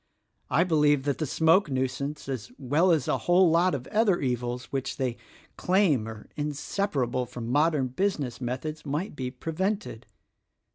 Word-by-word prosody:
I 170 - +3
beheve 150 -5 +3
that 140 -1 -1
the 155 - -1
smoke 165 +5 +3
nuisance 140 +3 -2
as 130 -6 -5
well 150 +7 +2
as 155 -6 +2
a - - +1
whole 175 -1 +6
lot 170 0 +3
of 125 -2 -6
other 210 -4 +3
evils 125 -1 -2
which 135 -1 -3
they 130 -3 -1 0.4
claim 180 - +2
are 110 -1 -9
inseparable 145 -4 -1
from 120 -1 -7
modern 145 -2 +2
business 140 -6 -2
methods 130 +6 -4
might 150 +6 -3
be 130 -3 -3
prevented. 165 - -3
145 Hz, 150 wpm, -27 LUFS, 125-170 Hz, 0.4 s, whole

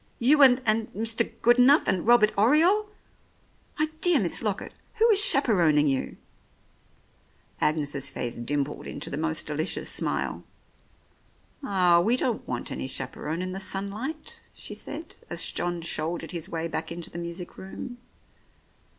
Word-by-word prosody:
"You 290 +5 +4
and 260 -1 +6
— - - -24
and 220 0 0
Mr. 225 +2 0
Goodenough 250 +5 +5
and 185 +2 -1
Robbie 235 -3 +5
Oriole! 330 - +4 0.9
My 310 - +1
dear 355 -5 +5
Miss 180 -6 0
Lockett, 210 -3 -3 0.2
who 455 0 +4
is 410 -1 +7
chaperoning 175 - +4
you? 135 -2 -2 0.7
" - - -33
Agnes's 145 -3 0
face 120 -3 -5
dimpled 140 +4 -3
into - - -7
the - - -3
most 160 0 -1
delicious 155 +3 -2
smile. - - -2 1.2
"Ah, 180 -8 +3
we 225 +8 +2
don't 245 -3 -2
want 120 -1 -4
any - - -4
chaperon 145 +6 -5
in 185 - -4
the 190 - -5
sun 195 +1 -1
light," 270 +10 -7
she - - -8
said, - - -7
as - - -2
John 175 -1 -3
shouldered 165 +1 -3
his 170 0 -4
way 165 -2 -3
back 165 - -5
into 170 0 -6
the 170 - -7
music 170 +1 -6
room. 245 +6 -8
190 Hz, 150 wpm, -26 LUFS, 160-245 Hz, 1.2 s, is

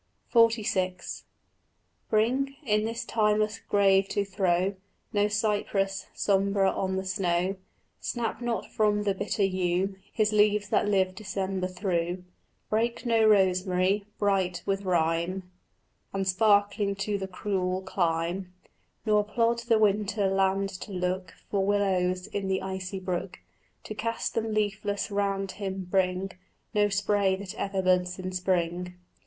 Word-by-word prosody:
XLVI 215 -6 +2 0.9
Bring, 255 +6 +1
in 215 -2 +2
this 230 +1 -3
timeless 215 -1 +1
grave 195 -1 +3
to 205 - 0
throw, 190 -1 +1 0.4
No 205 0 +3
cypress, 205 -2 0
sombre 195 -1 +2
on 190 -1 -2
the 190 0 -2
snow; 185 0 0 0.4
Snap 240 0 -3
not 240 -1 -1
from 210 -1 +2
the 200 -1 +1
bitter 205 +1 -1
yew 185 0 0 0.2
His 215 -1 +1
leaves 210 -1 +3
that - - +2
live 190 -2 +2
December 190 -1 -3
through; 180 -1 -2 0.5
Break 230 +3 0
no 225 -2 +4
rosemary, 190 0 +3
bright 190 -3 +1
with 195 0 -1
rime 175 +1 0 0.6
And 195 -1 -1
sparkling 205 +1 +3
to 200 +1 -2
the 190 - -4
cruel 185 -1 -2
clime; 175 0 -1 0.5
Nor 210 -1 +4
plod 230 +2 +1
the 235 -1 +2
winter 205 -1 +2
land 195 0 +1
to 210 - -7
look 180 -1 -2 0.2
For 200 -2 +1
willows 185 -2 +1
in 200 -2 -4
the 190 0 0
icy 190 0 -4
brook 185 0 -3 0.5
To - - -6
cast 230 +2 -2
them 225 -1 -1
leafless 205 -1 -1
round 195 -1 0
him: 190 -2 -5
bring 190 0 +1 0.4
No 205 -1 +3
spray 200 -1 +2
that 195 0 -7
ever 195 -2 -2
buds 180 -1 +2
in 185 0 -4
spring. 180 -1 -1
195 Hz, 135 wpm, -28 LUFS, 185-210 Hz, 0.9 s, no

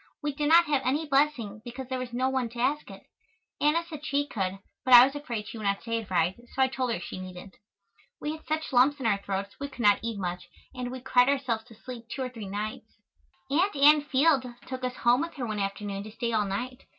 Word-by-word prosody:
We 295 -1 -1
did 295 +1 -1
not 340 +1 +7
have 290 -4 +1
any 285 +6 0
blessing 270 -8 +1
because 245 +2 -7
there 260 -1 -2
was 255 -1 -5
no 255 +2 0
one 260 -3 0
to 235 +1 -9
ask 290 +5 0
it. - - -11 0.6
Anna 315 +3 +3
said 305 -3 -9
she 285 -1 0
could, 195 -8 -3 0.3
but 255 -1 +8
I 240 +1 +11
was 275 - -3
afraid 240 -7 -5
she 230 - -7
would - - -6
not 200 0 0
say 230 0 -1
it 220 - -9
right, 180 0 +2 0.2
so 265 - +4
I 260 - +2
told 255 -2 -1
her - - -1
she - - -7
needn't. 185 +1 -9 0.6
We 295 - -3
had 315 0 -8
such 315 -2 -2
lumps 270 +4 +4
in 260 - -5
our 200 -3 +2
throats 200 0 -4
we 280 - -3
could 265 -3 -8
not 205 -1 +6
eat 225 -1 -3
much 180 -2 -4 0.2
and 250 -1 -4
we 255 0 -7
cried 250 0 +4
ourselves 250 -5 0
to 230 -2 -15
sleep 240 +1 -9
two 265 - -3
or 255 - -3
three 225 -5 -8
nights. 215 +2 -5 0.6
Aunt 360 +7 +2
Ann 295 +2 +7
Field 285 0 +3 0.2
took 260 0 -6
us 250 0 -2
home 245 +3 +3
with 335 - -4
her 260 -4 -3
one 215 -2 -3
afternoon 195 0 -3
to 215 +1 -9
stay 235 +2 -3
all 215 -2 +2
night. 250 +7 -4
250 Hz, 245 wpm, -28 LUFS, 215-280 Hz, 0.6 s, I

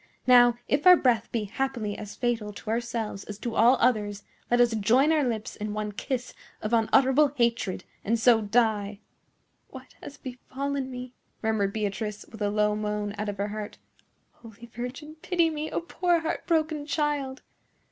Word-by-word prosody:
Now, 245 -1 +6
if 290 +5 +1
our 360 - +11
breath 235 -5 +1
be 230 -2 -1
happily 220 -1 -3
as 210 -1 -8
fatal 235 -4 -1
to 215 - -6
ourselves 230 -3 -3
as 205 - -7
to 235 +2 -4
all 235 +4 +5
others, 210 -4 +1 0.3
let 240 - +3
us 240 -1 +4
join 235 +8 +3
our 310 -2 +3
lips 225 -4 -3
in 210 0 -5
one 210 0 -3
kiss 250 +4 -4 0.3
of 215 +2 -4
unutterable 265 +5 +4
hatred, 230 -7 0 0.2
and 230 +2 0
so 230 -1 +5
die!" 210 -2 +1 0.7
"What - - -12
has 285 - -10
befallen 265 +2 -4
me?" 250 0 -7 0.3
murmured 215 -3 +1
Beatrice, 210 0 -3
with 220 - -11
a 205 - +1
low 210 0 +1
moan 210 -1 -2
out 210 0 -2
of 205 - -5
her 200 +1 -2
heart. 210 0 -6 0.5
"Holy 230 0 -14
Virgin, 265 +6 -7
pity 340 -3 +1
me, 310 0 -4
a - - -1
poor 345 0 0
heart 325 - -3
broken 310 -3 0
child!" 290 -4 -1
235 Hz, 170 wpm, -27 LUFS, 210-265 Hz, 0.7 s, our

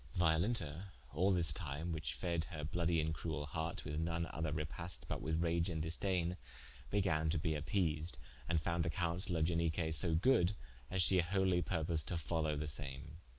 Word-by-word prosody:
Violenta 85 0 +1 0.3
all 90 +7 +3
this 85 -5 +3
time 75 +1 -3
which 80 -2 -2
fed 85 -3 -1
her 75 -4 -6
bloudie 85 +1 +1
and 80 0 0
cruell 80 -2 -3
harte 80 +3 -3
with 75 0 -2
none 85 +1 0
other 80 -1 -1
repaste 80 +1 -4
but - - -3
with 80 +3 0
rage 85 +1 +2
and 80 -2 -2
disdaine, 85 +2 0 0.5
began 85 -6 +2
to 80 - +1
bee 80 +1 0
appeased, 75 -1 0 0.3
and 85 -2 +3
founde 85 +2 0
the 85 - 0
counsaile 85 +2 0
of 80 - +3
Ianique 80 -1 +1
so 80 +2 +3
good, 90 0 +4 0.3
as 95 0 +2
she 95 0 +4
wholy 95 0 +2
purposed 80 -2 0
to 90 - 0
follow 80 -1 0
the 75 +1 -2
same. 70 +1 -3
80 Hz, 180 wpm, -37 LUFS, 80-90 Hz, 0.5 s, good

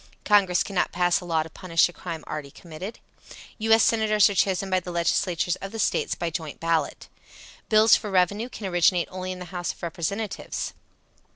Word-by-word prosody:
Congress 195 -4 +4
cannot 195 -3 -1
pass 175 -1 +2
a - - -9
law 165 -2 +1
to 160 - -11
punish 165 -2 +2
a 175 - -12
crime 165 -4 -7
already 150 -2 -6
committed. 170 +8 -9 0.6
U. 225 +1 -1
S. 225 0 +7
Senators 215 -2 +4
are - - -2
chosen 195 0 +1
by 185 -1 +2
the 180 - -9
legislatures 175 0 0
of 195 - -7
the 225 - -6
States 220 - 0
by 170 -1 -3
joint 155 -2 -5
ballot. 165 -3 -1 0.6
Bills 215 0 +6
for 210 - -3
revenue 200 +5 +1
can 220 - -8
originate 175 -1 +2
only 185 0 -5
in 185 - -5
the 180 - -8
House 175 -1 -2
of - - -22
Representatives. 185 +5 -4
180 Hz, 190 wpm, -25 LUFS, 170-200 Hz, 0.6 s, S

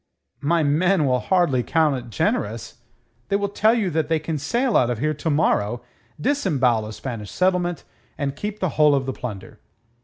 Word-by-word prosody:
"My 165 +3 +2
men 160 +3 +2
will 125 -2 +2
hardly 175 -5 +2
account 155 +3 +2
it 120 -1 -8
generous. 110 +1 -2 0.5
They 200 - +1
will 200 0 0
tell 215 +3 +3
you 205 -6 0
that 160 -1 0
they 160 0 +2
can 155 0 -3
sail 235 - 0
out 125 - +4
of 120 - -1
here 155 +6 0
to 155 +2 -3
morrow, 120 -6 +1 0.4
disembowel 135 - +1
a 110 - -7
Spanish 110 -4 -6
settlement, 180 -2 0 0.3
and 140 -1 -2
keep 210 +6 -5
the 185 - +1
whole 150 -1 +4
of 135 -1 0
the 130 - -3
plunder." 110 -7 -8
150 Hz, 185 wpm, -22 LUFS, 125-180 Hz, 0.5 s, out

